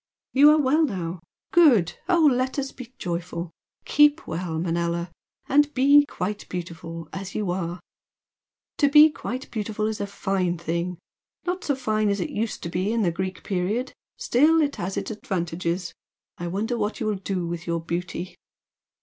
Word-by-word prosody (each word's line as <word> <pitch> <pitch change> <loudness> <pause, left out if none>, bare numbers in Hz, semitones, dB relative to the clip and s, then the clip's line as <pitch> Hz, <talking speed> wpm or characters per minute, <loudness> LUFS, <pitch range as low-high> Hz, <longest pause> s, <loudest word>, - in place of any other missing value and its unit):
"You 285 +3 +8
are 305 +1 +5
well 295 +3 +3
now? 180 - -2 0.3
Good! 255 - +5
O 340 -3 +4
let 260 -1 +2
us 275 -1 -2
be 255 -2 -10
joyful! 170 -1 -4 0.3
Keep 295 +1 +4
well, 165 0 -3
Manella! 170 +1 -1 0.4
and 295 +1 +4
be 285 +2 +6
'quite 205 +3 -4
beautiful' 165 -2 -6
as 195 0 -6
you 205 -4 -1
are! 175 -1 -3 1.0
To 285 - +5
be 300 +2 +8
quite 255 -2 -6
beautiful 215 -1 -2
is 215 -1 -2
a 200 - -2
fine 190 -3 -1
thing 170 +2 -2 0.5
not 360 +1 -2
so 285 - 0
fine 215 -5 0
as 200 0 0
it 180 - -3
used 220 +1 -3
to 170 - -3
be 185 +5 -1
in 230 -1 +1
the 175 - +2
Greek 185 +2 -4
period 200 +7 -1 0.2
still, 310 +6 +4
it 290 -2 +1
has 185 +2 -3
its - - -3
advantages! 175 -3 -3 0.5
I 175 - -3
wonder 220 +7 -2
what 210 0 -2
you 225 - -2
will 215 - +1
do 190 -2 -3
with 170 0 -5
your 170 0 0
beauty?" 170 +2 -4
195 Hz, 170 wpm, -25 LUFS, 175-260 Hz, 1.0 s, You